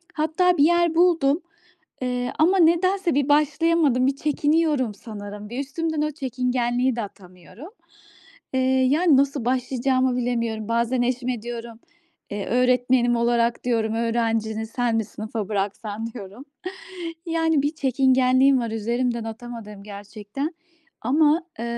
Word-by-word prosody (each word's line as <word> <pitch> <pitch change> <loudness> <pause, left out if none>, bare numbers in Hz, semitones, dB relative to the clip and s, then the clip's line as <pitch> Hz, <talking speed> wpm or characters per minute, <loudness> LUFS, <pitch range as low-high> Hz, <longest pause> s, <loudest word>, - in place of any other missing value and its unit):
Hatta 320 +4 +2
bir 285 - +5
yer 345 0 +3
buldum, 330 -3 +3 0.6
eee, 250 -1 -2
ama 355 +5 +4
nedense 350 +1 +3
bir 285 0 +1
başlayamadım, 300 -2 +3
bir 270 - +1
çekiniyorum 295 -4 +1
sanırım. 205 -1 -9
Bir, 245 - -5
üstümden 310 +3 -2
o 305 0 0
çekingenliği 250 -2 -1
de - - -1
atamıyorum. 195 - -11 0.8
Eee, 260 - +1 0.3
yani 310 0 +4
nasıl 275 -3 +1
başlayacağımı 255 0 +1
bilemiyorum. 230 -3 -2
Bazen 235 +2 +1
eşime 245 -1 -1
diyorum, 235 -1 -7 0.5
eee, 205 -1 -3
"Öğretmenim 250 0 +2
olarak" 235 0 +1
diyorum, 225 -3 0
"öğrencini 225 -1 -1
sen 240 0 -1
mi 225 -2 0
sınıfa 215 -1 -6
bıraksan." 205 +2 -3
diyorum. 210 +3 -10 0.8
Yani 325 -3 +1
bir 295 +2 -1
çekingenliğim 260 0 +3
var, 230 -2 -3
üzerimden 235 +2 -1
atamadığım 225 -3 -8
gerçekten 210 - -6 0.5
ama, 300 +6 +3
eee, 230 - -4
250 Hz, 125 wpm, -23 LUFS, 225-290 Hz, 0.8 s, bir